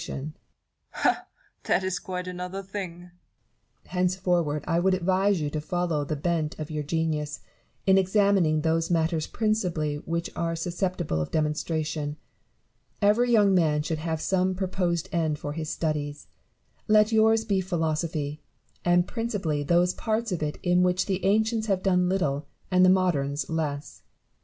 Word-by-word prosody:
Ha! - - +1 0.4
that 190 - +2
is 185 -1 -1
quite 180 -1 -5
another 180 +2 -5
thing. 185 -3 -6
Barrow. 180 0 -15 0.7
Henceforward 180 -5 0
I 165 - +1
would 185 +1 +3
advise 190 +1 +2
you 150 -1 -2
to 155 - -2
follow 170 -2 -1
the 150 +2 -3
bent 155 0 -1
of 155 +1 -6
your 155 -1 -2
genius, 150 -1 -2 0.4
in 195 0 +6
examining 190 -5 +3
those 165 +1 +1
matters 165 -2 +1
principally 180 -9 0
which 170 +3 -3
are 165 0 -1
susceptible 175 - -2
of 75 - -3
demonstration. 155 -1 -1 0.8
Every 220 +4 +3
young 205 -4 +5
man 155 -4 +2
should 155 0 -2
have 160 0 -2
some 185 +1 +1
proposed 180 -2 -1
end 160 -4 0
for 145 0 -5
his 155 0 -4
studies: 150 -3 -2 0.6
let 215 0 +5
yours 220 0 +4
be 195 -3 +1
philosophy; 155 -4 -2 0.4
and 175 0 +3
principally 205 -11 -2
those 175 +5 +3
parts 225 0 -1
of 175 - -2
it 150 -1 -2
in 180 0 +3
which 180 +1 +2
the 190 -1 -2
ancients 220 +2 +2
have 195 -3 0
done 180 -2 +3
little 150 -7 0 0.2
and 185 0 +5
the 185 - +7
moderns 145 -7 +1
less. 150 -3 -3
175 Hz, 150 wpm, -26 LUFS, 155-190 Hz, 0.8 s, the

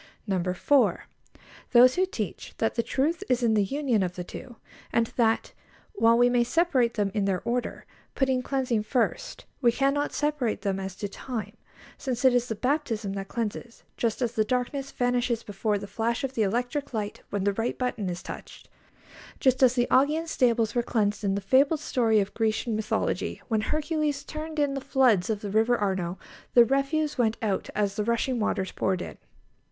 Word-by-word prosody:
4. 280 +7 +2 0.7
Those 250 +1 +8
who 370 +1 +1
teach 215 - -5
that 225 - 0
the 235 - +1
truth 300 +8 -1
is 250 -1 +2
in 225 -2 +3
the 210 -2 +3
union 255 0 0
of 180 -1 -2
the 180 - -4
two, 240 +6 -9 0.4
and 230 - +2
that, 225 -2 +1 0.4
while 230 - +4
we 245 0 +5
may 245 -1 +3
separate 260 -3 +2
them 205 -3 0
in 205 -3 0
their 190 -2 -1
order, 240 0 -2 0.3
putting 265 -2 +1
cleansing 255 -4 0
first, 250 - -2 0.2
we 240 -3 +5
cannot 275 +3 +1
separate 295 -9 -1
them 195 -2 -1
as 190 -1 -5
to 205 - -4
time, 230 +2 -6 0.4
since 255 -2 -2
it 260 - +6
is 245 0 +2
the 225 - -3
baptism 235 -5 -1
that 195 0 -5
cleanses, 230 +1 -5
just 230 +2 -1
as 235 - 0
the 220 -2 +1
darkness 255 +4 -2
vanishes 245 -1 0
before 205 +1 -1
the 200 - -6
flash 235 +5 -2
of 270 -1 -2
the 230 - -1
electric 245 +6 -1
light 210 -1 -4
when 200 -1 -2
the 200 0 +2
right 225 +4 -2
button 230 -6 -2
is 175 0 -5
touched; - - -9 0.7
just 260 0 +2
as 255 -1 +5
the 245 -1 +2
Augean 300 +5 +3
stables 235 -8 +1
were 240 - +2
cleansed, 215 -3 0
in 195 -1 +1
the 200 - -2
fabled 275 +9 +3
story 230 -6 +2
of 200 0 -2
Grecian 225 +1 0
mythology, 215 0 -1
when 220 -2 +1
Hercules 305 +1 -1
turned 310 0 -6
in 290 -2 +1
the 275 - -3
floods 255 -8 +3
of 210 -2 -1
the 205 - -5
River 225 +3 +3
Arno; 190 -3 -1 0.4
the 240 -1 +8
refuse 275 +3 0
went 225 -2 +2
out 200 -3 -1
as 205 -1 0
the 210 - -1
rushing 235 +3 0
waters 195 -3 -1
poured 185 -2 -1
in. - - -9
235 Hz, 190 wpm, -27 LUFS, 210-265 Hz, 0.7 s, Those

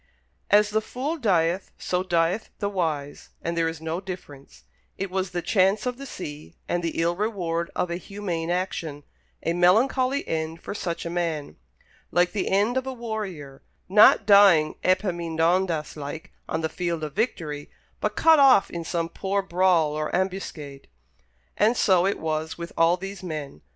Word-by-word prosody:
As 210 0 +5
the 215 +1 +1
fool 265 +8 -3
dieth, 185 - +1
so 180 0 -1
dieth 175 +2 0
the 200 - -2
wise, 155 -7 -3
and 170 0 -2
there 165 -1 +1
is 165 -1 -4
no 160 +2 -3
difference; 175 -8 -10 0.3
it 195 -1 -4
was 190 0 -1
the 175 -1 -4
chance 195 +2 +2
of 250 -1 -2
the 275 - -7
sea, 150 - -8
and 175 - 0
the 165 -1 -3
ill 170 +1 +1
reward 175 -5 -2
of 180 - -1
a 170 - -2
humane 180 -3 -4
action 170 -5 -3 0.4
a 165 - 0
melancholy 255 +10 +3
end 160 0 -3
for - - -6
such 170 -5 -4
a - - -3
man 165 - -2 0.5
like 175 +1 +2
the 205 - -2
end 210 +6 +2
of 260 0 -2
a 265 - -3
warrior, 200 - -6 0.3
not 210 +2 +6
dying 195 -7 +6
Epaminondas 170 -2 +1
like 150 +1 -7 0.2
on 160 - -1
the 160 - 0
field 170 -1 -3
of 150 - -4
victory, 160 -10 -2 0.3
but - - -2
cut 320 -2 +6
off 265 -7 +6
in 170 -1 -4
some 165 0 -2
poor 195 +3 -2
brawl 175 -4 +2
or 155 0 -2
ambuscade. 175 -7 -4 0.7
But 225 +3 +3
so 185 -2 +4
it 200 - 0
was 160 0 -3
with 170 0 -7
all 165 +2 +4
these 195 +1 -7
men. 155 - -6
175 Hz, 170 wpm, -25 LUFS, 165-200 Hz, 0.7 s, not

